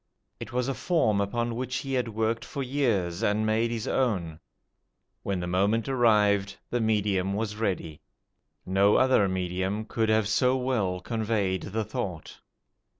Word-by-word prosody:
It - - -7
was 125 0 -1
a 135 - 0
form 120 - +1
upon 120 +4 -1
which 130 +1 -3
he 135 0 -3
had 125 -2 0
worked 115 +1 -1
for 140 - -5
years, 115 -11 0
and 105 +1 +1
made 110 +2 +1
his 115 -2 -3
own. 90 -11 -1 0.8
When 100 -2 -2
the - - -3
moment 100 +5 +1
arrived 105 -6 +3
the 120 - 0
medium 100 -3 +1
was 105 0 -3
ready. 90 -8 -3 0.6
No 100 +2 +3
other 130 -6 +4
medium 95 +3 -2
could 110 0 -1
have 110 -1 +3
so 125 +4 +2
well 110 -8 -1
conveyed 105 -3 -1
the 110 +2 -3
thought. 100 -11 -5
110 Hz, 150 wpm, -27 LUFS, 95-120 Hz, 0.8 s, other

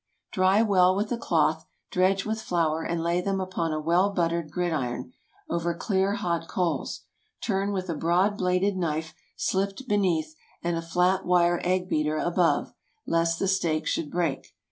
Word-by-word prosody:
✠ - - -51
Dry 190 +3 +3
well 185 -3 +4
with 210 +3 -1
a 240 - 0
cloth, - - +1 0.3
dredge 190 +2 +2
with 220 0 -2
flour, 165 -5 0
and 165 0 -2
lay 170 +1 +1
them 195 +1 -1
upon 185 -3 -2
a 155 - -1
well 170 +5 +2
buttered 170 -4 -1
gridiron, 140 -8 -2 0.3
over 170 0 -1
clear 195 +1 0
hot 170 -5 -2
coals. 180 -3 -2 0.4
Turn 200 -1 0
with 190 -2 -3
a 170 - -1
broad 175 +6 +2
bladed 185 +1 +1
knife 160 -2 -2 0.2
slipped 195 +6 -1
beneath, 175 -8 +1 0.3
and 170 0 0
a 165 - -2
flat 180 +3 +1
wire 175 -1 +3
egg 180 0 +1
beater 155 -2 0
above, 175 +2 +1 0.3
lest 165 0 +1
the 195 - 0
steak 170 -5 +1
should 150 - -1
break. 165 -6 -2
180 Hz, 165 wpm, -26 LUFS, 165-190 Hz, 0.4 s, well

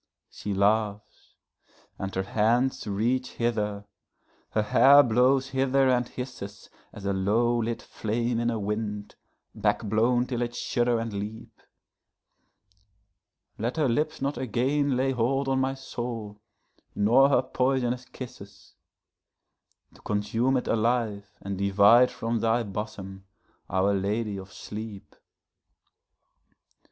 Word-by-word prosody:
She 105 - -6
laughs, 105 +1 -1 0.6
and 95 -1 -4
her 95 - 0
hands 115 +6 +1
reach 120 +6 -1
hither, 105 -3 -1 0.6
her 110 - 0
hair 140 +6 +7
blows 130 +3 +3
hither 135 0 +2
and 125 -1 +2
hissesAs 120 -7 -8 0.4
a 100 - +1
low 115 +5 +1
lit 115 +1 -3
flame 115 +2 -2
in 120 0 +1
a 115 - -1
wind, 105 0 -3 0.4
back - - 0
blown 115 +4 +2
till 125 -1 -3
it 120 0 -3
shudder 120 -1 0
and 115 -1 -3
leap; 105 +3 -6 2.1
Let 120 +7 -2
her 150 -3 +2
lips 150 +4 -1
not 140 +1 -1
again 130 +3 0
lay 135 +1 +1
hold 135 +3 0
on 135 0 +1
my 130 0 0
soul, 115 -5 -6 0.5
nor 120 +7 +5
her 130 -2 +3
poisonous 125 -1 0
kisses, 100 -7 -11 1.2
To - - -19
consume 115 +5 0
it 125 - -3
alive 110 -3 0
and 100 -1 -4
divide 100 +5 +5
from 115 0 -2
thy 115 +2 +1
bosom, 95 -2 -6 0.4
Our 95 +2 +2
Lady 100 +2 -1
of 95 0 -9
Sleep. 105 -2 -8
115 Hz, 120 wpm, -27 LUFS, 105-125 Hz, 2.1 s, hair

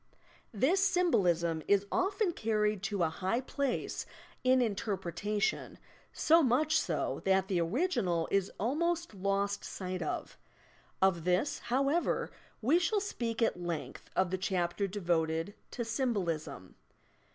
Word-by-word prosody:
This 310 - +2
symbolism 180 - +2
is 200 0 +3
often 390 +1 +1
carried 215 - 0
to 195 -2 -1
a 160 - +2
high 185 +8 -1
place 270 0 -2 0.4
in 255 0 +5
interpretation 205 -2 -1 0.2
— - - -32 0.2
so 330 +2 +7
much 300 +4 +3
so - - -2
that 190 -1 +2
the 180 -3 +1
original 180 - 0
is 195 -1 +1
almost 340 +6 0
lost 200 +1 -1
sight 185 -1 -5
of. - - -4 0.6
Of 180 -4 +3
this, 180 - +1
however, 275 +7 +1 0.3
we 295 +9 +4
shall 385 +4 +1
speak 235 - -2
at 180 - 0
length 170 -3 -5
in 185 -1 +3
the 190 - -1
chapter 185 +1 0
devoted 170 -2 -1 0.2
to 235 - -4
"Symbolism." 175 - -2
205 Hz, 130 wpm, -32 LUFS, 180-270 Hz, 0.6 s, so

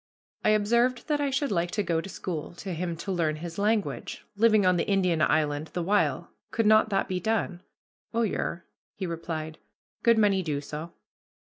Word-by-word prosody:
I - - +3
observed 235 +4 +2
that 295 -1 +1
I 285 - +1
should 275 -1 0
like 175 -2 +1
to 210 - +2
go 165 -3 0
to 195 - -8
school 170 -4 -5
to 185 +1 -5
him 170 0 -3
to 195 - -4
learn 165 -4 +1
his 170 +3 -7
language, 210 +1 -1
living 215 -1 +4
on 180 -1 +4
the 165 - -1
Indian 185 -5 +2
island 150 0 +1
the 175 - -1
while; 205 +4 +1 0.2
could 225 - 0
not 215 0 +5
that 195 -2 +1
be 185 -1 -2
done? 200 -3 -1 0.5
"Oh, 230 0 +1
yer," 185 -4 -2 0.3
he 195 - -4
replied, 160 -2 -5 0.4
"good 230 -1 +4
many 205 -3 +4
do 150 -5 -2
so." 150 +3 -7
185 Hz, 190 wpm, -27 LUFS, 165-215 Hz, 0.5 s, not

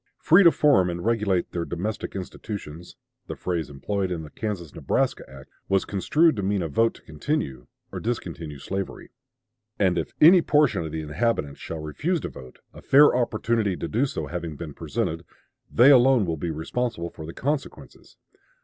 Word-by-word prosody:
"Free 175 +5 +5
to 170 - +9
form 135 - +3
and 85 0 -5
regulate 105 -6 0
their 85 - -2
domestic 95 +7 -4
institutions" 90 -3 -7 0.3
the - - -5
phrase 85 -5 -3
employed 95 +8 -3
in 85 -3 -4
the 75 - -11
Kansas 100 -8 -5
Nebraska - - -1
act 65 0 -13 0.2
was 95 -1 +2
construed 155 - +2
to - - -1
mean 100 -1 0
a - - -2
vote 115 +10 +1
to - - -17
continue 75 - -3 0.2
or - - -5
discontinue 85 -10 -4
slavery. 95 +7 -5 0.7
And 95 -3 +2
"if - - -5
any 175 +3 +8
portion 150 - +2
of 80 - -6
the 80 0 -3
inhabitants 75 -2 -1
shall 80 - -6
refuse 160 - -1
to - - -4
vote, 65 0 -13
a - - -12
fair 145 -1 +6
opportunity 115 -4 0
to - - -4
do 125 +6 +1
so 80 - -4
having 85 +1 -5
been 75 0 -7
presented,... 80 +3 -3 0.5
they 125 +5 +7
alone 130 -4 +5
will 85 -2 -2
be 80 +3 -4
responsible 85 +3 -3
for 80 - -9
the 85 - -7
consequences." 145 +1 -5
95 Hz, 175 wpm, -25 LUFS, 80-120 Hz, 0.7 s, to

